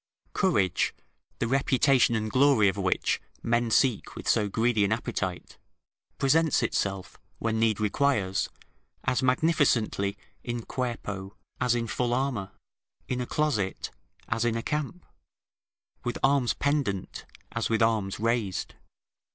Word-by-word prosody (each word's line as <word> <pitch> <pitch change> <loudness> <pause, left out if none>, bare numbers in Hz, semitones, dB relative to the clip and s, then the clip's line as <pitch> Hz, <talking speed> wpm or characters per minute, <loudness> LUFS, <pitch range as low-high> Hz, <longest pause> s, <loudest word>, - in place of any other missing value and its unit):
Courage, 160 - +1 0.4
the - - -1
reputation 130 -1 +3
and 110 -1 -2
glory 130 -6 +5
of 95 - +1
which 95 -2 0 0.2
men 120 0 +1
seek 120 -1 +2
with - - -8
so 105 -2 +2
greedy 115 0 +2
an 100 - +1
appetite, 95 -5 -3 0.6
presents 155 +2 +3
itself, 95 -1 -2 0.2
when 110 -1 -1
need 110 -2 +2
requires, 105 -3 +1 0.5
as 125 - +1
magnificently 125 -8 +2 0.3
in 120 -1 -4
cuerpo, 105 -6 -4 0.2
as 125 -1 +2
in 120 -1 -1
full 120 +1 -1
armour; 125 -7 -1 0.6
in 125 -1 -2
a 125 - -4
closet, 130 -11 -1 0.4
as 115 0 0
in 115 -1 +1
a 115 - -4
camp; 150 +4 -3 1.0
with 120 - -2
arms 135 -3 +3
pendant, 140 -10 -1 0.3
as - - -2
with 115 0 +2
arms 110 -4 0
raised. 115 -4 -1
115 Hz, 125 wpm, -27 LUFS, 105-130 Hz, 1.0 s, glory